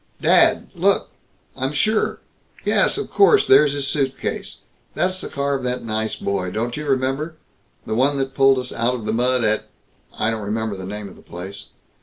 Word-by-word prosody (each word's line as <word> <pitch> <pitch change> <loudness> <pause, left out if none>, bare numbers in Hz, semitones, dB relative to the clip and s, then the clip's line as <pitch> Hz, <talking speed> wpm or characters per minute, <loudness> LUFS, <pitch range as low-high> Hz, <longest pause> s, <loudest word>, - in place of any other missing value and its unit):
"Dad! - - +4
Look! - - +1 0.4
I'm 135 +2 -2
sure 215 +8 +1 0.4
yes, - - +3
of - - -4
course, 405 +1 +5
there's 150 -2 +5
his 140 -1 -2
suitcase 135 -2 -2 0.4
that's 185 +1 0
the - - -5
car 140 0 -1
of 135 - -1
that 125 0 -2
nice 110 -1 -2
boy 95 -2 -2
don't 115 +5 -3
you 150 0 -5
remember? 135 +4 -1 0.5
the - - -3
one 135 +5 +2
that 135 0 -2
pulled 135 -1 +4
us 125 0 -4
out 120 +2 0
of 115 -4 -7
the 110 - -1
mud 125 +1 +2
at 110 0 +1 0.5
I 110 - +1
don't 110 -1 -3
remember 110 +1 -2
the 95 -1 -7
name 105 +1 -6
of 95 - -13
the - - -16
place. 95 +3 -9
125 Hz, 190 wpm, -21 LUFS, 110-140 Hz, 0.5 s, course